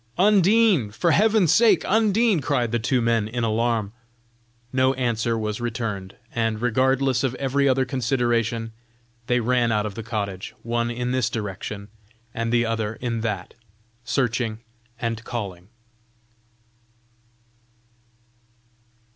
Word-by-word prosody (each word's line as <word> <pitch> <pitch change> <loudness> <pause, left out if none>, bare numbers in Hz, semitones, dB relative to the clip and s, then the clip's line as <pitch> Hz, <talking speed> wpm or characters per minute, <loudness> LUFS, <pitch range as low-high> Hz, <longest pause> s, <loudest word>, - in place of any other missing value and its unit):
"Undine! 200 - +4
for 165 - 0
Heaven's 210 -3 +4
sake, 230 -1 +4
Undine." 220 -1 +3
cried 120 -3 0
the 120 - +1
two 120 +2 +1
men 115 -2 +1
in 120 +2 -3
alarm. 115 -2 0 0.8
No 130 +1 +3
answer 115 -2 0
was 110 +1 -3
returned, 110 -5 -4 0.2
and 115 -2 0
regardless 130 +2 +1
of 130 -2 0
every 140 +1 +1
other 130 0 +2
consideration, 120 -3 0 0.6
they 125 0 +2
ran 120 0 +1
out 105 -1 +1
of 105 - -4
the 115 - -6
cottage, 100 -4 -4
one 120 0 -1
in 125 +1 -2
this 130 -3 +1
direction, 105 -2 -5 0.5
and 115 0 -2
the 120 0 +3
other 110 -1 -2
in 115 -2 -3
that, 105 -5 -3 0.5
searching 120 -3 -1 0.4
and 115 -2 -3
calling. 95 -8 -6
120 Hz, 120 wpm, -23 LUFS, 110-130 Hz, 0.8 s, Undine